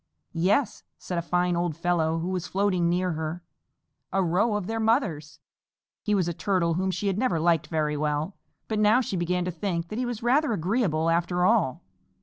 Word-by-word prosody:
"Yes," 205 +8 +1 0.2
said 175 -2 -3
a - - -1
fine 180 +1 0
old 170 -2 -1
fellow 165 -2 +1
who 170 +2 -3
was 180 -1 -3
floating 185 -3 +1
near 180 +1 +1
her, 160 +2 -4 0.7
"a 195 0 +1
row 185 +6 +1
of 205 -3 -2
their 225 +3 -3
mothers!" 200 - 0 0.6
He 210 - 0
was 185 -4 +1
a 170 - -1
Turtle 175 -1 0
whom 190 +3 0
she 185 +2 -3
had 195 0 0
never 195 -10 +1
liked 165 -1 +2
very 155 -2 -1
well, 150 +4 -1 0.3
but 215 -1 -1
now 215 +4 +5
she 210 - -3
began 180 0 0
to 180 - -2
think 170 -1 -3
that 215 - -4
he 255 - 0
was 235 -2 -5
rather 265 +2 +3
agreeable 175 -4 +1
after 175 +1 +1
all. 185 - +2
180 Hz, 195 wpm, -26 LUFS, 165-205 Hz, 0.7 s, now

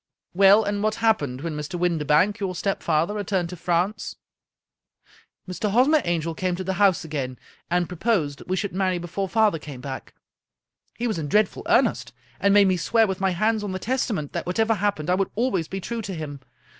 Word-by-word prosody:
" - - -66
Well, 195 +3 +6
and 205 0 -2
what 215 0 +1
happened 150 - +1
when 165 -1 -4
Mr. 150 +4 -4
Windibank, 170 +4 +2
your 190 -2 -2
stepfather, 170 -2 0
returned 195 -4 -1
to 180 - -6
France? 175 +4 -1 0.5
" - - -65
" - - -30
Mr. 195 +4 -2
Hosmer 265 +8 +4
Angel 165 -1 -1
came 180 +2 -1
to 185 - -5
the 190 +1 -2
house 190 -5 +4
again, 135 -5 -4 0.3
and 175 0 +1
pro 180 - -7
posed 165 - 0
that - - -13
we 185 - 0
should 195 0 -3
marry 185 -1 0
before 180 +3 -4
father 215 -4 +2
came 145 -4 -9
back. 130 +1 -7 0.8
He 240 - -2
was 220 -8 -1
in 150 - -3
dreadful 210 +6 +1
earnest, - - +2 0.3
and 200 - +3
made 200 -1 +6
me 185 -1 +2
swear, 225 +6 +3
with 190 -2 -3
my 190 - +3
hands 215 +4 0
on 200 -2 -3
the - - -2
Testament, 215 - -2
that - - -4
whatever 220 +5 +2
happened 200 -7 -1
I - - +4
would 195 +1 0
always 205 -8 0
be 195 - -5
true 230 +4 -4
to 195 -3 -5
him. 150 -3 -6
185 Hz, 210 wpm, -24 LUFS, 165-210 Hz, 0.8 s, Well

